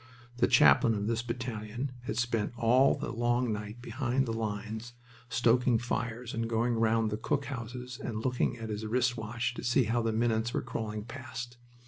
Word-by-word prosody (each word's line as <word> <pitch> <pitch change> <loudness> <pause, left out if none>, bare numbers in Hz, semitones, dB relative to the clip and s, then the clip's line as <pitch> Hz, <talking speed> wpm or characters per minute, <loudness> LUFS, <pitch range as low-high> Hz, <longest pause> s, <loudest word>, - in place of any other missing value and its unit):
The 120 - +4
chaplain 75 +11 +6
of 100 0 -2
this 115 +1 0
battalion 120 +1 -4
had 110 - -3
spent 120 -3 0
all 125 +4 +5
the - - -4
long 120 0 +1
night 105 +3 -6
behind 130 +2 0
the 115 - -2
lines, 110 +1 -4 0.4
stoking 120 +1 +3
fires 120 0 -3
and 115 0 -2
going 115 +1 +1
round 115 -1 +2
the 105 - -1
cook 140 +5 -1
houses 125 -1 -6
and 110 0 -4
looking 125 -1 +1
at 115 -1 -6
his 105 0 -3
wrist 125 +3 +1
watch 115 +2 -2
to - - -7
see 125 +2 +3
how 115 +2 +1
the 115 0 0
minutes 115 0 +1
were - - 0
crawling 110 -3 -4
past. 125 -1 -7
115 Hz, 180 wpm, -31 LUFS, 110-125 Hz, 0.4 s, chaplain